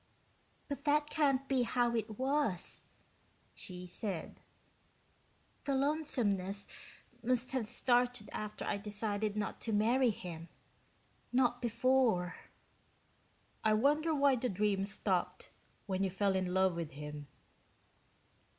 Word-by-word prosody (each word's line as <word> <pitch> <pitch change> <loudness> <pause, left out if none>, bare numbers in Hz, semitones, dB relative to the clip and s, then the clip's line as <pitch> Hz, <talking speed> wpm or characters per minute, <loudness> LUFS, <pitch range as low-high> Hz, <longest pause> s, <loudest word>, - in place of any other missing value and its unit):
"But 280 -1 -5
that 295 0 +2
can't 275 -3 +2
be 270 -2 +2
how 240 0 +1
it 220 -2 -2
was," 265 -8 0 0.7
she 180 -1 -8
said. 180 -1 -4 1.2
"The 275 - +1
lonesomeness 235 -10 0 0.5
must 250 +1 +1
have 255 -5 -1
started 245 -2 +1
after 210 0 -4
I 200 - 0
decided 210 0 -2
not 210 - -3
to 225 - -3
marry 235 +5 +4
him, 170 -5 -6 0.8
not 245 -1 +2
before." 235 -6 +2 1.3
"I 220 -1 +4
wonder 300 +8 +3
why 280 -2 +4
the 250 +1 -1
dream 195 0 +1
stopped 195 -2 -1 0.3
when 190 -1 -1
you 195 - +1
fell 195 +1 +1
in 185 -1 0
love 190 -1 +3
with 165 -4 -4
him." 150 0 -7
220 Hz, 115 wpm, -34 LUFS, 195-260 Hz, 1.3 s, marry